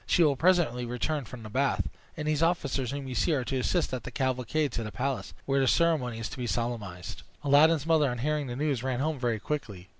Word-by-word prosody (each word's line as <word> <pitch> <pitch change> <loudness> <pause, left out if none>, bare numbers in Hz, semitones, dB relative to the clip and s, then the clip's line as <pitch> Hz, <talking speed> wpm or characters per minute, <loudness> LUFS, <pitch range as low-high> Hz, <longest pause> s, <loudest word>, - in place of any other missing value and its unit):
She 175 - +4
will 145 -3 +4
presently 160 -7 +3
return 125 +4 -2
from 115 +1 -9
the 110 - -8
bath; 135 +4 +1 0.3
and 150 -1 -3
these 155 0 +1
officers 140 -7 +1
whom 140 0 -4
you 130 - -4
see 135 +8 +2
are 130 - 0
to 130 +1 -2
assist 160 +4 0
at 130 - -2
the - - -6
cavalcade 130 +3 0
to 115 - -3
the 105 - -5
palace, 135 +2 -3
where 135 0 +2
the 135 - +3
ceremony 150 -8 +2
is 115 0 -4
to - - -8
be 125 - -2
solemnized." 110 -8 -3 0.2
Aladdin's 145 +2 +5
mother 160 -4 +4
on 125 - -3
hearing 150 +3 -1
this 120 0 -5
news 145 -4 0
ran 130 -1 -1
home 155 0 -1
very 120 -3 0
quickly. 100 -10 -5
135 Hz, 235 wpm, -29 LUFS, 120-150 Hz, 0.3 s, Aladdin's